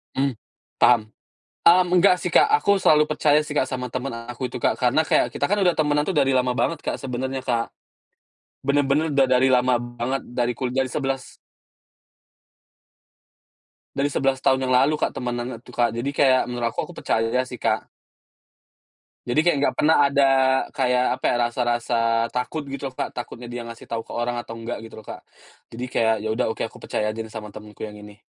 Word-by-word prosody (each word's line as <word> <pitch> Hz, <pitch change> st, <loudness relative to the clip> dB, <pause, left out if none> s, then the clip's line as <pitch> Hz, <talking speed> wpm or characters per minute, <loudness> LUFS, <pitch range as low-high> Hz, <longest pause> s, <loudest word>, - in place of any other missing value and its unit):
Mmm, 135 Hz, 0 st, +1 dB, 0.5 s
paham. 120 Hz, -3 st, +5 dB, 0.6 s
Mmm, 180 Hz, +1 st, +5 dB
enggak 180 Hz, 0 st, +5 dB
sih, 180 Hz, -, -2 dB
Kak. -, -, +6 dB
Aku 200 Hz, 0 st, +3 dB
selalu 150 Hz, 0 st, +5 dB
percaya 150 Hz, 0 st, +3 dB
sih, 150 Hz, -, -6 dB
Kak, 130 Hz, -, +2 dB
sama 125 Hz, -1 st, -4 dB
temen 130 Hz, 0 st, -3 dB, 0.2 s
aku 125 Hz, +1 st, -4 dB
itu, -, -, -8 dB
Kak. -, -, +1 dB
Karena -, -, +3 dB
kayak -, -, +2 dB
kita -, -, -2 dB
kan 205 Hz, -, +2 dB
udah 180 Hz, -3 st, +3 dB
temenan 150 Hz, -1 st, +1 dB
tuh 185 Hz, -, -1 dB
dari 135 Hz, -2 st, +3 dB
lama 125 Hz, 0 st, +2 dB
banget, 165 Hz, +2 st, 0 dB
Kak, -, -, -2 dB
sebenernya, 130 Hz, 0 st, -3 dB
Kak. 115 Hz, -1 st, -1 dB, 0.9 s
Bener-bener 145 Hz, +3 st, +1 dB
udah 135 Hz, -1 st, +4 dB
dari 130 Hz, +1 st, +3 dB
lama 125 Hz, -1 st, +3 dB
banget, 120 Hz, +2 st, -3 dB
dari 120 Hz, 0 st, 0 dB
kulia 130 Hz, +2 st, -1 dB
dari 130 Hz, -, -5 dB
sebelas 135 Hz, -2 st, -3 dB, 2.6 s
Dari 140 Hz, +1 st, +1 dB
11 135 Hz, -1 st, 0 dB
tahun 130 Hz, -1 st, +2 dB
yang 130 Hz, -, +1 dB
lalu 150 Hz, +4 st, +3 dB
Kak, -, -, 0 dB
temenan 120 Hz, 0 st, -3 dB
tuh, 125 Hz, -, -14 dB
Kak. 120 Hz, -2 st, 0 dB
Jadi 125 Hz, +4 st, -2 dB
kayak 130 Hz, -2 st, +3 dB
menurut 120 Hz, -1 st, -2 dB
aku -, -, -3 dB
aku -, -, -9 dB
percaya 115 Hz, +3 st, 0 dB
sih, 125 Hz, -, -9 dB
Kak. 110 Hz, -1 st, 0 dB, 1.4 s
Jadi 125 Hz, +5 st, +1 dB
kayak 175 Hz, -3 st, +2 dB
nggak -, -, +2 dB
pernah 155 Hz, +2 st, +4 dB
ada 140 Hz, 0 st, +3 dB, 0.5 s
kayak, 125 Hz, -2 st, +2 dB
apa -, -, -6 dB
ya, -, -, +1 dB
rasa-rasa 120 Hz, -1 st, -1 dB, 0.3 s
takut 125 Hz, +5 st, -3 dB
gitu, 135 Hz, -1 st, -5 dB
Kak, -, -, -3 dB
takutnya 120 Hz, 0 st, -7 dB
dia 120 Hz, 0 st, -5 dB
ngasih 115 Hz, 0 st, -10 dB
tau 115 Hz, -1 st, -3 dB
ke -, -, -10 dB
orang 120 Hz, +1 st, -2 dB
atau 120 Hz, -1 st, -6 dB
enggak 115 Hz, +1 st, -5 dB
gitu, 110 Hz, -, -11 dB
Kak, -, -, -9 dB, 0.5 s
jadi 120 Hz, +2 st, -5 dB
kayak 110 Hz, -2 st, +2 dB
ya 110 Hz, -, -2 dB
udah 125 Hz, -, 0 dB
oke -, -, -7 dB
aku -, -, -16 dB
percaya 105 Hz, 0 st, -1 dB
aja 110 Hz, +1 st, -4 dB
sama 105 Hz, -2 st, -7 dB
temenku 105 Hz, +1 st, -12 dB
yang 105 Hz, -, -11 dB
ini. 105 Hz, 0 st, -13 dB
125 Hz, 190 wpm, -23 LUFS, 120-140 Hz, 2.6 s, Kak